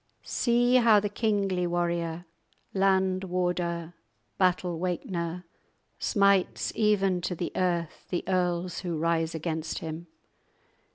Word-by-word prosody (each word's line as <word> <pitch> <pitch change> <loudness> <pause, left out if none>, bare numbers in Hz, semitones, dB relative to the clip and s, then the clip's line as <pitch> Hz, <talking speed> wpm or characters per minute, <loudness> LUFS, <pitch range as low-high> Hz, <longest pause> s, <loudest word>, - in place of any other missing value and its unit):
_ - - -20
"See 245 +1 +3
how 230 -4 +6
the 205 0 -2
kingly 200 -4 0
warrior, 170 -1 -1 0.5
Land 190 -1 +2
warder, 175 -2 -2 0.5
battle 180 -2 +1
wakener, 180 -1 -3 0.6
Smites 200 -3 +2
even 195 -4 +2
to 180 0 -2
the 170 - -3
earth 175 -3 -1
The 175 - -1
earls 180 -1 0
who 175 -3 -3
rise 165 0 0
against 160 0 -3
him! 160 +2 -6
180 Hz, 115 wpm, -28 LUFS, 170-195 Hz, 0.6 s, how